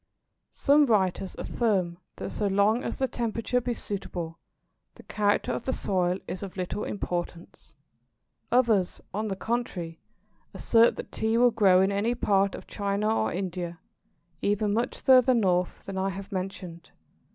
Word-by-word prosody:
Some 290 +1 +4
writers 190 -4 +1
affirm 185 -7 -1 0.2
that - - -6
so 210 - -1
long 205 +5 +2
as - - -4
the 265 - +1
temperature 235 +1 -1
be 245 0 -2
suitable, 175 -6 -5 0.6
the - - -14
character 205 -1 0
of - - -4
the 260 - 0
soil 180 -4 0
is 185 - -5
of 195 -2 -7
little 185 +3 -3
importance. 175 -5 -5 0.8
Others, 225 -7 +2
on 215 +2 -2
the 195 - -2
contrary, 190 -7 -3 0.6
assert 230 0 +4
that - - -8
Tea 220 +1 0
will 245 0 +5
grow 195 -5 +5
in 195 - +1
any 210 +5 0
part 200 -4 +2
of - - -10
China 205 +2 -1
or 110 - 0
India, 175 -2 -4 0.6
even 205 0 +1
much 235 +3 -1
further 255 -1 +5
north 180 -5 0
than 195 -1 -4
I 190 +1 0
have 195 +1 -7
mentioned. 185 -3 -6
200 Hz, 150 wpm, -27 LUFS, 185-230 Hz, 0.8 s, will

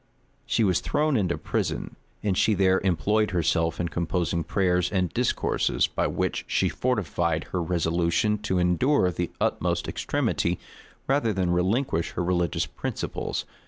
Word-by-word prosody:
She 115 - +2
was 95 -4 +3
thrown 150 0 +1
into 95 -7 +1
prison, - - -2 0.3
and 100 -3 +1
she 105 +3 +3
there 95 0 +3
employed 105 +4 +2
herself 85 -2 0
in 85 -1 -1
composing 85 +1 -1
prayers 90 0 +1
and 90 -4 0
discourses, - - +1
by - - -1
which - - -1
she - - +1
fortified 85 - 0
her 90 - -1
resolution 85 +4 +1
to 95 -3 -1
endure 90 +5 +3
the 85 +1 -2
utmost - - 0
extremity 85 +1 -1 0.5
rather 135 -5 +2
than 95 -2 0
relinquish 90 - 0
her - - -1
religious 85 -1 0
principles. 70 - -4
90 Hz, 140 wpm, -26 LUFS, 85-105 Hz, 0.5 s, was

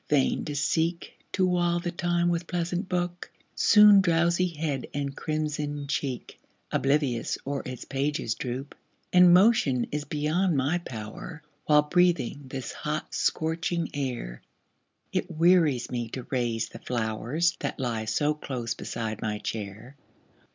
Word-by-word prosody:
vain 140 -3 +2
to 145 - -5
seek 165 +4 0 0.2
To 185 - +2
while 175 -1 +2
the 175 0 -3
time 175 0 +1
with 170 0 -1
pleasant 175 +2 -2
book, 175 -1 -2 0.2
Soon 210 -1 +7
drowsy 170 0 +2
head 150 -5 -3
and 140 -1 -2
crimsoned 150 -2 -3
cheek 135 -4 -3 0.3
Oblivious 135 -4 +1
o'er 140 0 -2
its 130 -2 -7
pages 135 -3 -1
droop 130 +4 -5 0.4
And 180 -1 +8
motion 180 - +4
is 150 0 -2
beyond 155 +4 0
my 145 +6 +1
power, 130 +5 -8 0.2
While 150 -1 +6
breathing 170 -4 +1
this 130 -2 -5
hot, 150 +1 -4
scorching 165 +1 -1
air, 125 - -4 0.7
It - - -1
wearies 165 -6 +3
me 120 -2 -3
to 125 - -6
raise 115 -3 -1
the 115 - -10
flowers, 120 +9 -1
That - - -4
lie 115 -4 -2
so 145 +7 +1
close 125 -6 -4
beside 110 -2 -5
my 105 -1 -2
chair. 110 +5 -6
150 Hz, 135 wpm, -27 LUFS, 125-170 Hz, 0.7 s, And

